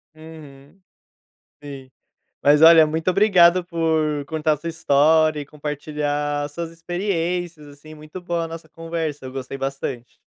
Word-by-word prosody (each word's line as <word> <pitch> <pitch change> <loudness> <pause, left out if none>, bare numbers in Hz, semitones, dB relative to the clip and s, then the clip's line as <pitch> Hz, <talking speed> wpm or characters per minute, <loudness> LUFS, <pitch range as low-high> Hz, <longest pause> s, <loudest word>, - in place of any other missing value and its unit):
Uhum. 155 0 -14 0.8
Sim. 135 -2 -10 0.5
Mas, 145 +1 +4
olha, 165 -1 +8
muito 160 +3 -2
obrigado 185 -3 +4
por 160 -4 -1
contar 155 +1 0
a - - -4
sua 170 +4 -6
história 155 0 +2
e 145 - -6
compartilhar 145 0 -3
as 145 - -6
suas 170 +2 -5
experiências, 175 -2 -3
assim, 145 +2 -14
muito 155 +4 -10
boa 175 -1 -2
a - - -4
nossa 165 -1 -10
conversa, 165 -3 -5
eu 130 - -7
gostei 135 0 -6
bastante. 135 -3 -5
155 Hz, 145 wpm, -21 LUFS, 145-165 Hz, 0.8 s, olha